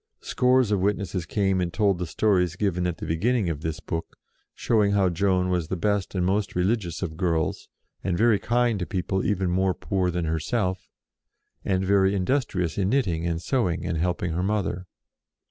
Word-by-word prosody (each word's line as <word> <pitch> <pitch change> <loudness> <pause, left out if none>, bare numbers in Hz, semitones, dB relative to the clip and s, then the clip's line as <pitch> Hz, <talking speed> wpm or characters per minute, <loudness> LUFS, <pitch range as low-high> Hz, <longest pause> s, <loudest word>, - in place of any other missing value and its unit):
Scores 125 -3 +2
of 100 - +2
witnesses 95 -3 -1
came 95 -1 +1
and 85 -1 -1
told 100 -2 +1
the 90 - -3
stories 90 0 +1
given 90 -2 0
at 85 -3 -3
the - - -6
beginning 100 +3 +1
of 75 -2 -5
this 80 -1 -3
book, 80 0 -5 0.4
showing 105 -3 +2
how 100 -2 +3
Joan 90 +1 +1
was 90 -3 0
the 95 - -2
best 100 +1 -1
and 90 -1 +1
most 100 +2 0
religious 90 -1 0
of 80 -4 -4
girls, 80 -3 -1 0.3
and 90 -3 0
very 110 0 +4
kind 120 -2 +1
to 90 - -3
people 95 0 -1
even 95 -3 0
more 95 +1 +1
poor 95 -2 -1
than 90 -1 -2
herself, 90 +4 -2 0.7
and 95 -1 0
very 100 0 +3
industrious 95 - -1
in 95 -1 +1
knitting 90 -10 0
and 85 -1 -1
sewing 95 -10 0
and 85 -3 -2
helping 90 0 -1
her 85 +3 -1
mother. 95 -2 -1
95 Hz, 180 wpm, -25 LUFS, 85-100 Hz, 0.7 s, very